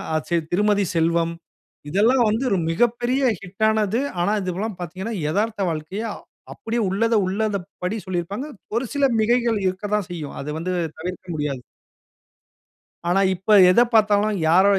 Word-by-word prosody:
அ - - +3
சரி, 170 -2 +2
திருமதி 205 +1 +2
செல்வம் 165 0 +1 0.6
இதெல்லாம் 230 - +3
வந்து 225 +5 0
ஒரு 195 - +2
மிகப்பெரிய 240 +6 +1 0.2
ஹிட் 195 +3 -6
ஆனது. 220 +1 +1 0.2
ஆனா, 205 +4 +1
இது 185 -1 -2
எல்லாம் 215 -2 -3
பார்த்தீங்கன்னா, 190 +6 -5 0.2
எதார்த்த 210 0 0
வாழ்க்கைய 160 +7 -4 0.5
அப்பிடியே 230 +1 -3
உள்ளத 225 +4 +1
உள்ளத 205 +2 0 0.3
படி 200 +5 -1
சொல்லியிருப்பாங்க. 185 - -3 0.3
ஒரு 240 +3 0
சில 285 -1 +2
மிகைகள் 235 -1 +2
இருக்கத்தான் 205 +1 -1
செய்யும். 155 -5 -6
அது 145 - -6
வந்து 180 +2 -3 0.3
தவிர்க்க 180 +1 -6
முடியாது. 145 -4 -3 1.5
ஆனா 190 +3 +3
இப்ப 200 +4 +3
எத 210 - +5
பார்த்தாலும் 210 -1 +3
யார, 180 +4 +5
200 Hz, 140 wpm, -22 LUFS, 180-225 Hz, 1.5 s, எத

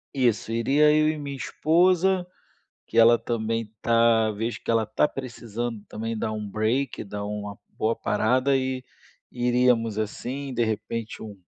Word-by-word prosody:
Isso, 120 -4 +1
iria 140 +6 +3
eu 155 0 +4
e 155 - -2
minha 140 -1 -5
esposa, 180 +5 +2 0.6
que 115 - -1
ela 115 +1 +8
também 115 -2 -2
está 115 -1 +3
vejo 115 +3 -3
que - - -16
ela 115 -1 +3
está 110 +7 +1
precisando 120 -4 -5
também 115 +1 -4
dar 110 - -2
um 105 0 -4
break 115 +7 -1
dar 100 +1 -5
uma 105 -1 -5
boa 110 +1 -1
parada, 130 +6 +1
e 130 -1 -2 0.5
iríamos 120 -3 +2
assim, 130 +6 -4
de 120 -1 +1
repente, 110 +1 -4
um 105 -3 -9
115 Hz, 150 wpm, -25 LUFS, 110-130 Hz, 0.6 s, ela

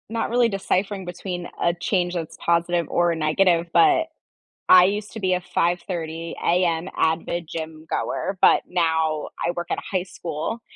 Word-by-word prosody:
Not 225 0 -2
really 240 0 +3
deciphering 195 -1 -1
between 180 0 -5
a 170 - +2
change 175 0 -1
that's 165 -3 -5
positive 170 0 +1
or 175 -1 +2
negative, 165 +2 +2
but, 360 -5 +4 0.6
I 180 -1 +9
used 205 +2 -1
to 220 - -7
be 185 -2 +1
a 180 - -1
05:30 170 -2 -2
AM 170 0 +1
avid 165 +1 0
gym-goer, 160 +4 -4
but - - +5
now 160 -3 0 0.2
I 170 - +1
work 175 0 -4
at - - +1
a 200 - -4
high 180 - 0
school, 180 +4 -5
175 Hz, 155 wpm, -23 LUFS, 165-190 Hz, 0.6 s, I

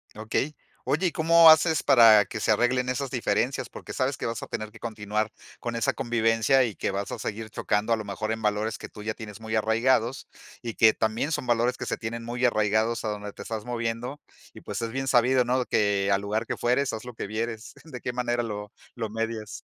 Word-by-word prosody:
Okey. 110 +7 -2 0.3
Oye, 180 +5 +1
¿y - - -1
cómo 165 +1 +7
haces 160 0 +4
para 115 -6 +7
que - - -6
se - - -2
arreglen 125 +1 +2
esas 130 +1 -2
diferencias? 125 +1 -1
Porque - - -9
sabes 135 0 -1
que - - -5
vas 115 -1 -3
a - - -7
tener 110 -1 -5
que - - -15
continuar 110 -1 -3 0.3
con 120 -1 -4
esa 115 - +1
convivencia 115 +1 +2
y 115 -4 -2
que - - -2
vas 100 +1 -3
a - - -5
seguir 110 +1 -5
chocando, 105 +3 0
a - - +4
lo 110 - -6
mejor, 110 +2 -3
en 110 - -3
valores 105 +1 -1
que - - -8
tú 105 - -11
ya 110 - -2
tienes 105 -1 -9
muy 110 0 -4
arraigados 115 +3 +1 0.4
y 115 -2 -4
que 110 -1 +5
también 110 +8 -1
son 135 - -2
valores 120 +1 +1
que - - -5
se - - -2
tienen 115 +1 -5
muy 120 +2 -4
arraigados 110 0 +2
a 110 - 0
donde 105 -1 -5
te - - -9
estás 110 -1 -5
moviendo 120 +3 -3 0.3
y, - - -12
pues, - - -5
es 115 - -3
bien 135 +2 -3
sabido, 125 0 +4
¿no?, 125 +1 +1
que, 100 -1 +1
al 100 0 +2
lugar 110 +2 -2
que - - -3
fueres, 125 +3 +1
haz 110 +2 -6
lo 125 - -8
que 110 - -5
vieres, 110 +1 -4
¿de 130 -7 -9
qué 125 - -2
manera 120 -1 -1
lo 105 -3 -5 0.2
lo 110 -3 -4
medias? 115 -1 -4
115 Hz, 230 wpm, -26 LUFS, 110-125 Hz, 0.4 s, cómo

